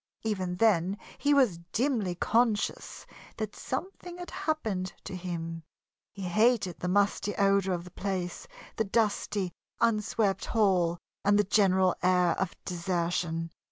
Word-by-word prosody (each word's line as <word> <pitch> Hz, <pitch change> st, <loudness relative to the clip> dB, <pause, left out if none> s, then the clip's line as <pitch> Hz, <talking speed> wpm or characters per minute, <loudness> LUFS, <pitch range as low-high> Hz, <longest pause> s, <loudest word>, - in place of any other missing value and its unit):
Even 190 Hz, -5 st, -1 dB
then 195 Hz, -2 st, +3 dB, 0.2 s
he 290 Hz, -, +2 dB
was 255 Hz, -12 st, +4 dB
dimly 225 Hz, -8 st, 0 dB
conscious 225 Hz, +2 st, 0 dB, 0.3 s
that 215 Hz, -2 st, -4 dB
something 355 Hz, +4 st, -5 dB
had 355 Hz, 0 st, -8 dB
happened 215 Hz, -, -2 dB
to -, -, -6 dB
him. 165 Hz, -2 st, -4 dB, 0.5 s
He 195 Hz, -, -8 dB
hated 205 Hz, 0 st, +2 dB
the 180 Hz, -, -3 dB
musty 205 Hz, +2 st, +1 dB
odor 195 Hz, -1 st, +3 dB
of 175 Hz, -1 st, -2 dB
the 180 Hz, -, -12 dB
place, 185 Hz, -2 st, -3 dB, 0.3 s
the 220 Hz, -, +2 dB
dusty, 205 Hz, -3 st, 0 dB, 0.3 s
unswept 215 Hz, -3 st, +1 dB
hall, 185 Hz, -6 st, +2 dB, 0.3 s
and 205 Hz, 0 st, +4 dB
the 210 Hz, -, +4 dB
general 190 Hz, -2 st, +3 dB
air 180 Hz, -1 st, +4 dB
of 190 Hz, -2 st, -2 dB
desertion. 170 Hz, -2 st, -1 dB
195 Hz, 130 wpm, -29 LUFS, 180-220 Hz, 0.5 s, was